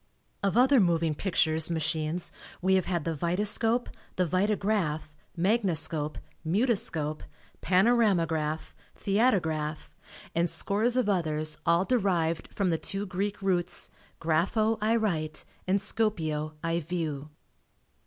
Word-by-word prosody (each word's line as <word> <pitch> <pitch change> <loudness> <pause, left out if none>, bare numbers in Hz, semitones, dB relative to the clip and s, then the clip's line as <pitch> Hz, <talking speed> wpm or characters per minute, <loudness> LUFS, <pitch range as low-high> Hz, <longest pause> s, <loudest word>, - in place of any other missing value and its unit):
Of 200 +2 0
other 260 +2 +5
moving 170 -4 +2
pictures 160 -2 +1
machines 160 +1 -2 0.3
we 190 +2 +2
have 190 -1 +2
had 175 -4 -1
the 165 - -1
vitascope, 210 - +2 0.3
vitagraph, 185 -3 0 0.2
magniscope, 170 -6 +1 0.3
mutoscope, 165 - 0 0.4
panoramagraph, 180 -7 +1 0.2
theatograph 165 -8 0 0.4
and 170 +1 +1
scores 225 +5 +1
of 255 - +2
others 155 -6 0
all 170 +3 +3
derived 180 -9 0
from 195 -3 0
the 165 - 0
two 195 +1 -1
Greek 200 +2 -3
roots 175 -2 +1 0.3
grapho 200 +8 +1
I 220 +2 +2
write 165 -9 -1 0.2
and 190 +2 +3
scopeo 165 -8 0
I 165 0 0
view. 155 -3 -4
180 Hz, 110 wpm, -28 LUFS, 160-205 Hz, 0.4 s, other